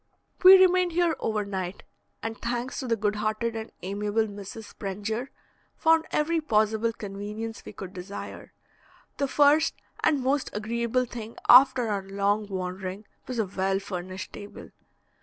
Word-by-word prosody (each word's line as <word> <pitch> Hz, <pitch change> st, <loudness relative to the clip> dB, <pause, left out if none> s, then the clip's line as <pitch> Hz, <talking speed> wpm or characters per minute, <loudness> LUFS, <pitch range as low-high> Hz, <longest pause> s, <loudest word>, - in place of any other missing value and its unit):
We 380 Hz, +1 st, +11 dB
remained 365 Hz, -2 st, +4 dB
here 340 Hz, -2 st, +2 dB
over 215 Hz, -2 st, -1 dB
night, 190 Hz, -2 st, -4 dB, 0.4 s
and, 225 Hz, 0 st, -3 dB
thanks 240 Hz, +2 st, -3 dB
to 260 Hz, -, -4 dB
the 230 Hz, -, +2 dB
good 210 Hz, -1 st, -1 dB
hearted 215 Hz, +2 st, -1 dB
and 220 Hz, 0 st, -5 dB
amiable 205 Hz, +3 st, 0 dB
Mrs. 205 Hz, +1 st, -8 dB
Sprenger, 210 Hz, +5 st, -4 dB, 0.5 s
found 320 Hz, 0 st, +3 dB
every 325 Hz, +2 st, +1 dB
possible 220 Hz, -3 st, +2 dB
convenience 210 Hz, +2 st, -6 dB
we -, -, -10 dB
could 190 Hz, -1 st, -8 dB
desire. 185 Hz, +2 st, -8 dB, 0.7 s
The 280 Hz, -, 0 dB
first 295 Hz, +3 st, +4 dB, 0.3 s
and 295 Hz, -3 st, +3 dB
most 270 Hz, +1 st, +1 dB
agreeable 235 Hz, +4 st, 0 dB
thing 230 Hz, -2 st, -8 dB
after 255 Hz, -1 st, +7 dB
our 205 Hz, -2 st, -1 dB
long 200 Hz, +2 st, 0 dB
wandering, 185 Hz, +1 st, -5 dB, 0.2 s
was 255 Hz, -, -4 dB
a 220 Hz, -, +1 dB
well 190 Hz, 0 st, 0 dB
furnished 185 Hz, -1 st, -6 dB
table. 205 Hz, 0 st, -10 dB
220 Hz, 145 wpm, -27 LUFS, 200-255 Hz, 0.7 s, We